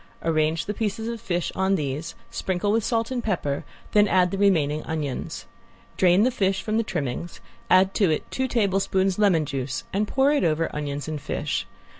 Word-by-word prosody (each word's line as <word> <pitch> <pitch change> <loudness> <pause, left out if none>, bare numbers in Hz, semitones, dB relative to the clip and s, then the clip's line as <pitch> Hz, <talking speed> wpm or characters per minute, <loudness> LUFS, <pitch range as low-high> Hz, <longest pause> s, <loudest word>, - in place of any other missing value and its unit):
Arrange 160 0 +1
the 210 - -2
pieces 220 +1 -2
of 230 -1 -4
fish 175 -5 -1
on 190 +1 +1
these, 150 +1 -3 0.2
sprinkle 190 +2 -1
with 225 +1 +2
salt 230 +2 0
and 245 -2 -2
pepper, 150 -10 -1 0.3
then 210 0 +5
add 180 -2 +3
the 195 - -2
remaining 155 -7 +3
onions. 155 -5 -4 0.5
Drain 185 +2 +4
the 255 - +3
fish 195 -5 0
from 215 0 0
the 230 - +2
trimmings, 150 - -4 0.3
add 185 +1 +5
to 200 -5 +3
it 155 - 0
two 260 0 -1
tablespoons 195 -4 +1
lemon 180 -7 +4
juice 135 +1 -3
and 205 +2 +1
pour 270 +4 +3
it 295 - +2
over 165 0 +1
onions 145 0 -3
and 155 -2 -4
fish. 145 +1 -2
185 Hz, 185 wpm, -25 LUFS, 155-210 Hz, 0.5 s, then